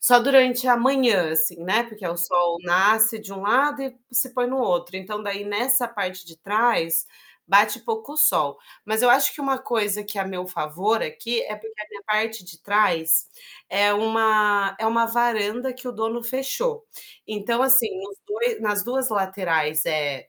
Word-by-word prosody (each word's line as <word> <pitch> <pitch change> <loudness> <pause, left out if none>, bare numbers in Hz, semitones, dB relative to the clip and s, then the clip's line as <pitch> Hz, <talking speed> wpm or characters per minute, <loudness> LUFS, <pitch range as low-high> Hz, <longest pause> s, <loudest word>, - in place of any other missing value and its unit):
só 245 -1 +7
durante 255 -1 +4
a 245 - +5
manhã, 235 -9 +2
assim, 165 +2 +1
né, 210 +7 +1
porque 215 -4 -14
o 170 0 -4
sol 175 0 +1
nasce 215 +5 +3
de 205 -2 -11
um 195 0 -9
lado 275 +7 +2
e 265 -1 -6 0.2
se 250 +2 +1
põe 245 -1 0
no 265 +1 -2
outro. 180 -6 -1
Então, 210 +3 -7
daí 200 0 -5
nessa 245 +5 +1
parte 190 -5 -6
de 165 -1 -15
trás, 170 -4 +1 0.4
bate 205 +4 +4
pouco 445 -10 -6
sol. 145 - +2 0.3
Mas 220 +1 -1
eu 245 - +4
acho 275 +3 +4
que 295 - -10
uma 270 -1 -1
coisa 210 -5 -2
que 205 0 -7
é - - +1
a - - -6
meu 185 -1 -6
favor 185 +6 -2
aqui, 230 +9 -3
é 210 - -6
porque 220 0 -11
a 210 - -8
minha 205 -1 -12
parte 220 -1 -1
de 175 -2 -13
trás, 165 -6 +2 0.4
é 205 +1 +2
uma 210 -2 +2
é 220 - 0
uma 230 +1 +2
varanda 235 +1 -1
que 255 +1 -13
o 245 - -4
dono 225 +2 -3
fechou. 445 - -3 0.4
Então, 215 +3 -2
assim, 265 -3 +5
nos 200 0 -10
2 460 +3 -2
nas 205 -1 -1
2 260 +2 -1
laterais 180 -7 -1
é 145 -4 -2
215 Hz, 185 wpm, -23 LUFS, 190-245 Hz, 0.4 s, só